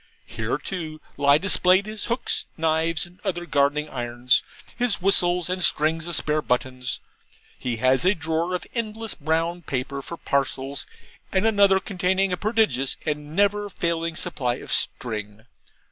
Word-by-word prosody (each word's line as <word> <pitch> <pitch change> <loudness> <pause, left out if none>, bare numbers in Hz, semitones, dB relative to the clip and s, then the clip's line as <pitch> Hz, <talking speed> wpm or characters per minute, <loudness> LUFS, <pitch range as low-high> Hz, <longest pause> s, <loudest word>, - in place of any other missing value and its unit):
Here, - - -2
too, 160 -5 -5 0.2
lie 140 0 +5
displayed 185 +1 +4
his 215 -1 -4
hooks, 235 +2 0
knives, 160 +1 +1
and 175 +1 -18
other 175 -4 -2
gardening 145 0 +1
irons, 120 -2 +1 0.3
his 245 -3 +1
whistles, 180 -2 +3
and 185 0 -1
strings 160 +1 +3
of 175 - 0
spare 155 0 +1
buttons. 125 -1 -2 0.6
He 125 -2 -2
has 130 +4 +3
a 190 +3 +4
drawer 165 +2 -1
of 180 - -4
endless 225 -2 -3
brown 165 +3 -1
paper 140 -2 -3
for 170 +5 -7
parcels, 140 -1 -1 0.4
and 190 +2 +2
another 200 -3 +5
containing 190 -1 0
a - - +2
prodigious 210 - +1
and 150 0 -3
never 205 +1 +2
failing 165 -3 -2
supply 125 -5 -1
of - - -8
string. 105 -2 -2
165 Hz, 145 wpm, -24 LUFS, 140-190 Hz, 0.6 s, lie